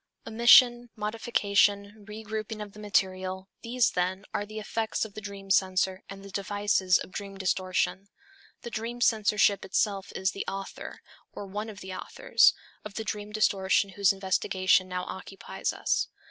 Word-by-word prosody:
Omission, 240 +1 +6
modification, 210 -1 +1
regrouping 215 0 -5
of 210 -1 -7
the 210 - -12
material, 190 -2 -1
these, 240 +1 +1
then, 185 +3 -1
are 205 - -2
the 215 +1 -9
effects 220 +1 -2
of 215 - -11
the 215 - -8
dream 200 -1 -8
censor 190 0 +2
and 195 0 -9
the 200 - -11
devices 200 -2 +1
of - - -8
dream 195 0 -7
distortion. 190 +1 -1 0.6
The 235 - -7
dream 230 +2 -4
censorship 210 -3 +3
itself 195 0 -1
is 190 0 0
the 200 - -5
author, 195 0 -6 0.3
or 205 - -7
one 210 +3 -5
of 205 -3 -10
the 190 0 -7
authors, - - +3 0.3
of 210 -1 -9
the 220 - -3
dream 210 -1 -5
distortion 200 -2 +2
whose 200 +1 +3
investigation 190 -1 +1
now 180 0 -3
occupies 190 +1 -5
us. - - 0
200 Hz, 155 wpm, -28 LUFS, 190-215 Hz, 0.6 s, Omission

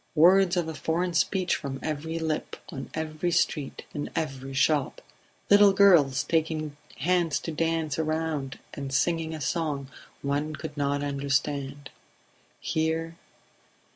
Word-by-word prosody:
Words 180 +3 +6
of 170 -2 0
a 160 - -4
foreign 165 +5 -1
speech 185 +2 +2
from 135 -2 -5
every 160 +2 -3
lip, 160 -2 -2 0.2
on 135 - -6
every 160 +2 -2
street, 160 -4 0
in 145 - -4
every 135 -4 -3
shop... 145 0 +2 0.5
Little 205 -1 +7
girls 175 -10 +5
taking 155 -2 -1 0.2
hands 170 0 +2
to 165 - -4
dance 160 -2 -1
a - - +2
round 155 -4 -2 0.2
and 140 -1 -5
singing 160 +4 +1
a - - -6
song 145 -1 -2 0.3
one 145 +2 -1
could 150 - -7
not 145 0 0
understand... 140 0 -2 0.7
Here 160 +1 -1
155 Hz, 135 wpm, -27 LUFS, 140-165 Hz, 0.7 s, Little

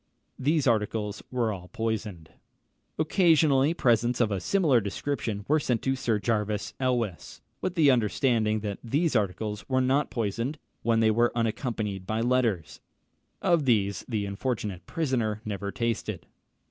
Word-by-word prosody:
These 150 +2 +2
articles 105 -3 0
were 120 -3 0
all 90 -2 -9
poisoned. 105 -7 -4 0.7
Occasionally, 155 -3 +3
presents 120 -3 +2
of 115 -3 +2
a 100 - 0
similar 150 - +3
description 105 -1 -3
were 155 +2 +3
sent 125 -5 -1
to 135 0 +1
Sir 120 -4 0
Jervis 105 -1 -1
Elwes, 120 -8 -2 0.2
with 185 -1 -2
the 150 -5 +5
understanding 110 -2 +1
that 100 -2 -4
these 145 +6 0
articles 105 0 -1
were 130 -1 +2
not 130 +3 +2
poisoned, 115 +6 -2 0.2
when 115 -1 +2
they 110 -1 +4
were 120 +2 +3
unaccompanied 110 -4 -2
by 110 +1 -1
letters: 115 -7 0 0.6
of 170 -5 +3
these 100 -6 +1
the 105 -4 -1
unfortunate 100 -3 -3
prisoner 120 -9 -1
never 100 -1 -3
tasted. 115 0 -2
115 Hz, 140 wpm, -27 LUFS, 105-130 Hz, 0.7 s, the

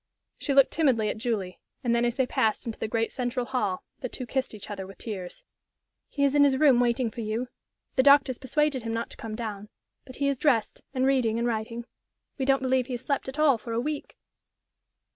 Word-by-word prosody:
She 280 - -1
looked 275 -1 +6
timidly 250 -9 +2
at 215 - -4
Julie, 210 -6 -2 0.2
and 240 -2 +2
then, 235 0 +3
as 240 0 0
they 265 - +2
passed 220 -3 0
into 230 -2 -5
the - - -2
great 225 +1 0
central 250 0 -2
hall, 210 -8 -1 0.2
the 250 - -4
two 255 - -6
kissed 265 -2 -2
each 210 0 -8
other 195 -2 -5
with 195 - -12
tears. 190 -6 -6 0.7
"He 280 - -1
is 280 -1 +3
in 290 -1 +6
his 275 -2 +4
room, 270 -4 +5
waiting 240 -1 +1
for 235 - -6
you. 225 +3 -2 0.4
The 260 - +4
doctors 280 -2 +5
persuaded 290 0 +1
him 225 0 -3
not 230 +1 -3
to - - -12
come 220 -1 -6
down. 210 -3 -5 0.4
But 255 - -11
he 280 - 0
is 280 -2 0
dressed, 250 -8 +1
and 260 0 +2
reading 255 -5 +2
and 235 +1 0
writing. 230 +1 -3 0.5
We 265 - 0
don't 270 0 +3
believe 260 -1 +2
he 260 - -4
has 240 - -3
slept 275 0 -2
at 265 - -8
all 290 -6 +4
for 230 +1 -6
a 230 - +1
week." 295 +3 -4
245 Hz, 225 wpm, -27 LUFS, 225-270 Hz, 0.7 s, looked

